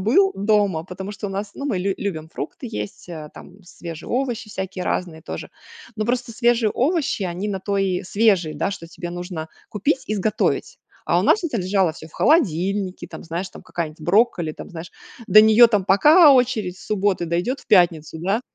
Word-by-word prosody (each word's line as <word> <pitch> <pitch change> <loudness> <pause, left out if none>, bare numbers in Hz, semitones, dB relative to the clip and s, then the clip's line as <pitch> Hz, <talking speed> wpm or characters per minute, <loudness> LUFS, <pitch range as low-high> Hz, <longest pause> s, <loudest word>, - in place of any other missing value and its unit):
был 380 - +3
дома. 200 -5 +1
Потому 190 +2 -7
что 205 +1 -6
у 195 - -5
нас 200 +1 -4
ну 280 - -5
мы 215 -10 -1
лю 195 +1 -1
любим 160 -6 -4
фрукты 160 - -6
есть, 200 -4 -6
э, 155 -3 -7
там, 195 +2 -14
свежие 170 -2 -9
овощи 245 -3 -2
всякие 190 -2 -5
разные 170 -3 -2
тоже, - - -7 0.4
но 215 0 -2
просто 245 -1 -1
свежие 235 -2 +2
овощи 295 - 0
они 180 +3 -3
на 195 -2 -3
то 200 +1 -2
и 190 -1 0
свежие 190 -5 +2
да, 190 - -1
что 170 -4 -7
тебе 175 +1 -7
нужно 175 -2 -6 0.2
купить 260 +7 -1
и 215 - -1
сготовить. 210 +3 -1 0.3
А - - +3
у - - -1
нас 420 - +3
это 295 -8 -2
лежало 185 -3 +1
всё 160 +1 -12
в - - -24
холодильнике, 195 - +1
там, - - -10
знаешь, 170 +3 -4
там, - - -13
какая-нибудь 160 -2 -5
брокколи, 175 -2 +2
там, 175 - -10
знаешь, 165 0 -8 0.4
до 215 +3 +9
нее 220 +2 +7
там 210 -4 +1
пока 295 - +7
очередь 235 -8 +1
с - - -13
субботы 195 -4 0
дойдет 175 +11 -1
в - - -21
пятницу, 170 -5 +3
да. 195 +8 0
195 Hz, 195 wpm, -22 LUFS, 175-220 Hz, 0.4 s, до